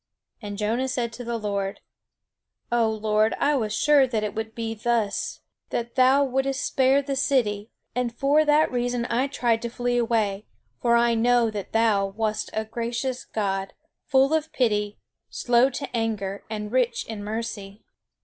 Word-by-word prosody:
And 205 -2 -6
Jonah 225 +5 0
said 245 -3 -2
to 245 - -7
the 235 0 -2
Lord: 200 -2 -3 0.9
"O 235 -2 +3
Lord, 215 0 +1
I 295 +1 +2
was 220 -5 -1
sure 285 +4 +4
that 225 -4 -1
it 210 - -2
would 220 0 -5
be 225 -1 -3
thus, 225 -2 -1 0.3
that 235 0 -3
thou 260 +2 +5
wouldest 270 +1 -1
spare 270 +1 +3
the 275 0 -2
city; 230 -6 +1 0.2
and 250 -1 -1
for 280 +5 +3
that 300 +1 +3
reason 245 -1 -1
I 250 +4 +1
tried 235 -4 0
to 235 - -3
flee 245 +1 -1
away; 215 -3 0 0.3
for 235 -1 +3
I 235 0 +4
know 235 0 +3
that 205 -2 -6
thou 220 -3 +2
wast 215 +2 -2
a 220 0 -2
gracious 235 +3 -3
God, 195 -2 -2 0.3
full 270 +2 +4
of 315 0 0
pity, 210 -4 0 0.3
slow 245 +2 +3
to 275 +1 -5
anger, 205 -4 -2
and 210 -1 -5
rich 250 -1 +1
in 215 -2 -6
mercy. 210 -2 -5
235 Hz, 165 wpm, -25 LUFS, 215-255 Hz, 0.9 s, thou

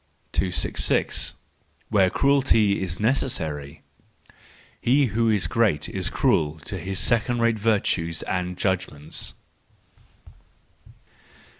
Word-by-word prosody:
266. 90 -2 0 0.5
Where 95 -3 +3
Cruelty 130 -7 +3
is 90 -3 -3
Necessary 80 - -1 1.0
.—He 135 +4 +3
who 115 0 +2
is 105 -3 +2
great 100 -11 +1
is - - -1
cruel 75 0 +1
to - - -6
his 95 0 -4
second 120 +3 +1
rate 115 -1 +2
virtues 95 -7 0
and 90 -1 -3
judgments. 90 -6 -2
95 Hz, 95 wpm, -24 LUFS, 85-115 Hz, 1.0 s, Where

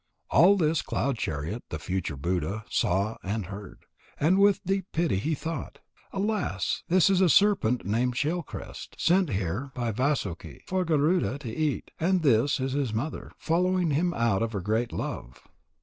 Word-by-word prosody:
All 195 +4 +6
this 160 -3 +2
Cloud 135 -4 -2
chariot, 80 +11 -3
the 80 - -4
future 90 -1 -3
Buddha, 90 +7 -2
saw 100 +5 +1
and 105 +1 -3
heard. 100 +1 -10 0.3
And 175 +6 +3
with 200 -1 +4
deep 195 0 -1
pity 165 - +1
he 155 +11 -1
thought: 160 +1 -5 0.3
"Alas! 205 +1 -1
This 185 0 +4
is 195 -1 +3
a 185 - +5
serpent 185 - +3
named 120 +5 0
Shell 160 +7 0
crest, 150 - -9
sent 180 0 +3
here 100 +7 -2
by 120 -2 -1
Vasuki 100 - -2
for 185 0 0
Garuda 155 -1 +2
to 120 -6 -7
eat. 155 -3 -1
And 180 +1 +2
this 135 0 +3
is 130 0 -1
his 135 -5 -1
mother, 140 +8 -4
following 180 0 +1
him 170 +5 +1
out 115 -4 +1
of 115 0 -1
her 100 - -2
great 110 +5 0
love. - - -6
135 Hz, 165 wpm, -27 LUFS, 105-175 Hz, 0.3 s, All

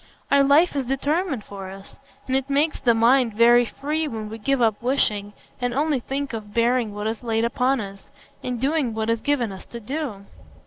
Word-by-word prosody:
Our 280 0 +6
life 290 +4 +4
is 275 -2 -1
determined 280 - -1
for 195 -2 -8
us; 195 +1 -12 0.3
and 260 - -1
it 270 +1 0
makes 295 +3 +1
the 235 -2 +3
mind 235 0 +3
very 240 +2 +6
free 305 +6 -2
when 220 -5 -5
we 225 - -7
give 275 +5 0
up 220 -3 +2
wishing, 210 -5 0 0.3
and 245 -1 -1
only 295 -1 +1
think 275 +2 -4
of 210 -2 -7
bearing 235 -2 +1
what 210 0 -4
is 220 0 -2
laid 225 -1 0
upon 255 +2 +1
us, 195 -2 -8 0.3
and 250 -2 -3
doing 270 -3 0
what 220 +1 0
is 230 -1 -1
given 255 -7 0
us 190 - -9
to 235 - -8
do." 235 -4 -5
240 Hz, 205 wpm, -23 LUFS, 220-275 Hz, 0.3 s, Our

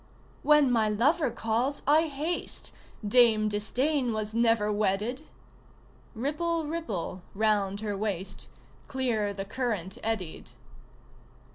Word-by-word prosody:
"When 300 -3 +5
my 220 -3 +3
lover 275 +8 +2
calls 235 +5 -1
I 310 +3 +4
haste 310 +4 -3 0.3
Dame 220 -1 +5
Disdain 245 +5 0
was 215 0 -3
never 225 -2 +2
wedded!" 215 +8 -1 0.9
Ripple 315 +7 -1
ripple 225 - -4
round 205 -1 +1
her 210 -2 -2
waist, 195 -2 -3 0.4
Clear 235 -6 0
the 195 -1 -5
current 210 -5 -3
eddied. 215 -7 -3
225 Hz, 105 wpm, -28 LUFS, 205-275 Hz, 0.9 s, When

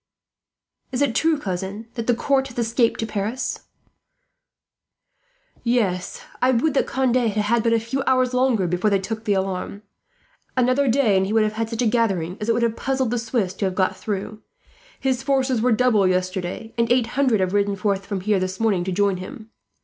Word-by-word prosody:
"Is 260 +2 +1
it 270 -5 +1
true, 320 +6 +2
cousin, 195 0 -5
that 230 -3 -5
the 245 - +3
court 270 +2 +1
has 250 - -13
escaped 235 0 +1
to - - -1
Paris?" 220 +4 -3 2.0
"Yes. 210 -7 -1 0.2
I 255 - +4
would 260 +4 +2
that 280 - +1
Conde 260 -2 +1
had 240 -3 +2
had 215 +3 +1
but 230 - +1
a 230 - +3
few 235 +5 -3
hours 255 -1 +2
longer, 250 -6 +2
before 180 +4 +1
they 200 - +3
took 220 +4 -5
the 205 - +2
alarm. 190 +2 -3 0.7
Another 255 +3 +3
day, 240 -4 +3
and 190 0 +1
he 210 - -2
would 220 -1 +4
have 215 0 -1
had 225 +1 -2
such 230 +1 -2
a - - +1
gathering 195 -7 +1
as 210 - -2
it - - +4
would 235 +1 0
have 230 -1 +1
puzzled 265 -2 -1
the 245 - 0
Swiss 225 -5 -1
to 195 - -2
have 185 -1 -2
got 185 -1 +1
through. 210 +1 -5 0.6
His 260 -1 0
forces 265 -3 +1
were 250 +2 +2
doubled 220 -4 +3
yesterday, 185 +4 -2
and 230 0 +2
eight 245 -1 +4
hundred 260 -5 +2
have 185 0 0
ridden 200 0 +1
forth 195 0 -1
from 200 -2 -3
here 205 0 +1
this 185 +1 -3
morning 210 -6 +1
to 190 - -2
join 200 0 +1
him. 220 +4 -9
225 Hz, 205 wpm, -22 LUFS, 195-250 Hz, 2.0 s, I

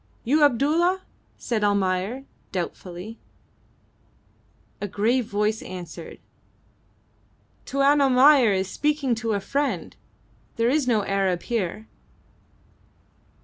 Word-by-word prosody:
"You 290 +6 +2
Abdulla?" 315 +8 +2 0.3
said 225 -3 -2
Almayer, 200 +5 0 0.3
doubtfully. 180 +3 -6 1.6
A 205 - -2
grave 225 +5 +1
voice 210 0 -1
answered 175 -2 -9 1.5
"Tuan 275 +1 +3
Almayer 265 -2 +6
is 190 -1 0
speaking 295 +2 0
to 225 -1 -2
a 200 - 0
friend. 270 -3 -2 0.6
There 230 0 +1
is 290 -2 +1
no 215 -5 +2
Arab 190 -3 0
here." 215 -2 -3
225 Hz, 95 wpm, -24 LUFS, 195-275 Hz, 1.6 s, Almayer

